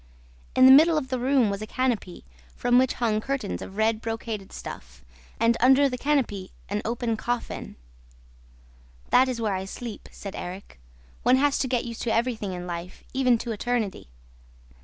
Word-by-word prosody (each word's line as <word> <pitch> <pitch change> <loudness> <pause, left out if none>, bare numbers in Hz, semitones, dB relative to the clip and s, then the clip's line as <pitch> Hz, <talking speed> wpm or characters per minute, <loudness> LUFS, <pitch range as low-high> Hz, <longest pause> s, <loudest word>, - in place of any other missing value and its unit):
In 255 - +7
the 260 - +10
middle 315 +4 +7
of 265 -4 -2
the 255 -1 -1
room 255 -4 +3
was 200 +1 -4
a 215 - -5
canopy, 235 - -2 0.3
from 245 0 +3
which 260 0 +2
hung 220 -3 0
curtains 270 -5 -3
of 195 - -9
red 220 0 +1
brocaded 225 -3 -5
stuff, - - -9 0.3
and, 230 +1 +4
under 265 +3 +6
the 255 - -3
canopy, 245 -9 0 0.2
an 205 +1 -1
open 230 0 -1
coffin. 240 +2 -4 1.4
'That 260 +1 +6
is 250 -2 -3
where 215 -3 0
I 190 0 -3
sleep,' 225 +2 -8
said 200 -1 -8
Erik. 180 - -8 0.4
'One 255 - +5
has 280 +1 +2
to 265 - 0
get 250 -1 0
used 230 -1 -6
to 235 - -1
everything 225 -4 -1
in 180 0 -6
life, 175 +1 -7
even 255 -2 +3
to 235 +1 -5
eternity.' 220 - -2
235 Hz, 175 wpm, -26 LUFS, 210-255 Hz, 1.4 s, the